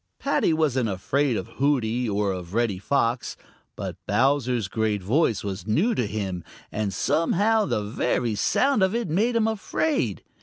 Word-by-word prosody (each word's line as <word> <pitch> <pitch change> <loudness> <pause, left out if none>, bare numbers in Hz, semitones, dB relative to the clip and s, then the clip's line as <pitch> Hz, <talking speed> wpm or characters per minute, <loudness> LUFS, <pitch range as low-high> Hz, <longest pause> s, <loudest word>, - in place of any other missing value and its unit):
Paddy 280 -10 +1
wasn't 135 -7 +1
afraid 125 +6 0
of - - -4
Hooty 125 -4 +1
or 100 -1 0
of 90 +1 -6
Reddy 115 -5 +1
Fox, 120 +2 0 0.4
but - - -5
Bowser's 125 -4 +2
great 105 -1 -1
voice 115 - +1
was 95 -1 -5
new 175 - +2
to 120 - 0
him, 95 -4 -3 0.3
and 105 -2 -2
somehow 205 - +2
the 105 - -1
very 115 +2 -1
sound 245 - +2
of 190 +3 +2
it 235 -3 -1
made 220 +9 +1
him 225 -1 +3
afraid. 275 +8 -1
120 Hz, 155 wpm, -25 LUFS, 105-165 Hz, 0.4 s, him